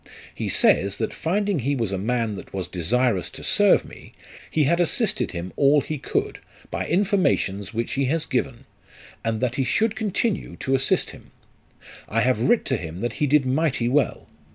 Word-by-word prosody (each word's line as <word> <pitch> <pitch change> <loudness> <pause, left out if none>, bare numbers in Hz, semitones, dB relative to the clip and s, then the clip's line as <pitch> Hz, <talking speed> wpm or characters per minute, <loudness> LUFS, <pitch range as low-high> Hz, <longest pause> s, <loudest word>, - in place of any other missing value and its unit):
He - - -4
says, 100 +1 +3
that - - -2
finding 200 +1 0
he 140 +3 0
was 115 -6 -1
a 95 - -1
man 115 +1 -1
that 95 - -9
was 95 -2 -3
desirous 105 +3 0
to - - -11
serve - - +4
me, - - -14 0.4
he 155 - +2
had 170 +5 +2
assisted 215 +4 +1
him 90 +1 -6
all 145 +1 +4
he 155 0 -5
could, - - -2 0.3
by - - -3
informations 170 - +1
which 115 +1 -3
he 135 0 0
has 155 +4 0
given; 130 0 -2 0.6
and 115 -1 -1
that 125 0 -1
he 135 - +2
should 220 - +1
continue 220 0 -2
to 135 - -2
assist 135 +1 +1
him. - - -15 0.8
I 115 +2 +1
have 125 -3 +1
writ 240 -1 +3
to 130 - 0
him 85 -1 -7
that 120 -2 -2
he 150 - +3
did 145 0 +3
mighty 130 -2 0
well. 135 0 0
130 Hz, 185 wpm, -23 LUFS, 110-160 Hz, 0.8 s, serve